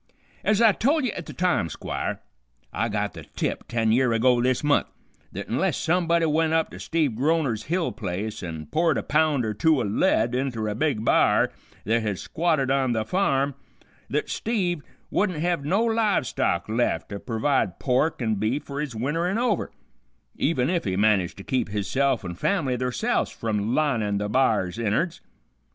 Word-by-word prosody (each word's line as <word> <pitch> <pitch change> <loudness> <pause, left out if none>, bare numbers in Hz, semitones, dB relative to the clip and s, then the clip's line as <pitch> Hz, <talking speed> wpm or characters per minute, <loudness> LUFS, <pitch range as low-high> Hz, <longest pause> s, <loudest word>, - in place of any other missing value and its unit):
"Ez 210 0 +2
I 225 - +7
tol' 285 +9 +1
ye 250 - 0
at 175 - -7
the - - -7
time, 175 - +1
Squire, - - -4 0.5
I - - 0
got - - -2
the - - -9
tip - - -2
ten 115 -2 +1
year 125 0 +3
ago 120 +1 +3
this 130 +2 +1
month, 145 -1 +3 0.4
th't - - -6
unless - - 0
somebody 170 -1 +2
went 160 +1 +2
up 160 0 +1
to - - -9
Steve 155 -6 0
Groner's 135 -5 0
hill 170 +1 0
place 105 0 -4
an' 80 -4 -6
poured 165 - +1
a - - -2
pound 150 -4 +2
or 110 - -1
two 150 +8 +3
o' - - 0
lead 110 +3 +2
inter 125 -4 -1
a 105 - -1
big 115 -2 -1
b'ar - - +4 0.3
th't 115 +3 +2
had 105 -3 -2
squatted 155 - 0
on 135 -3 +2
tha' 110 -1 -1
farm, 140 - +1 0.6
th't 150 - 0
Steve 185 -8 -1 0.3
wouldn't 185 -5 +1
hev 170 -1 0
no 195 +9 +2
live 225 - +2
stock 85 -6 -1
left 115 +3 0
to 100 - -5
pervide 115 -4 0
pork 130 +2 +1
an' 110 -1 +1
beef 115 +8 0
fer 140 0 -6
his 145 -6 -4
winterin' 165 - -1
over, 235 -5 0 0.7
even 135 -5 +1
if 175 -1 0
he 95 -2 -1
managed 100 -3 +2
to 95 - -9
keep 125 -2 -1
hisself 120 +4 0
an' 85 - -4
fam'ly 135 - 0
theirselfs 125 0 -1
from 110 0 -2
linin' 115 -10 +1
the 105 +1 -2
b'ar's 110 -4 +1
innards. 120 - 0
130 Hz, 180 wpm, -25 LUFS, 110-165 Hz, 0.7 s, I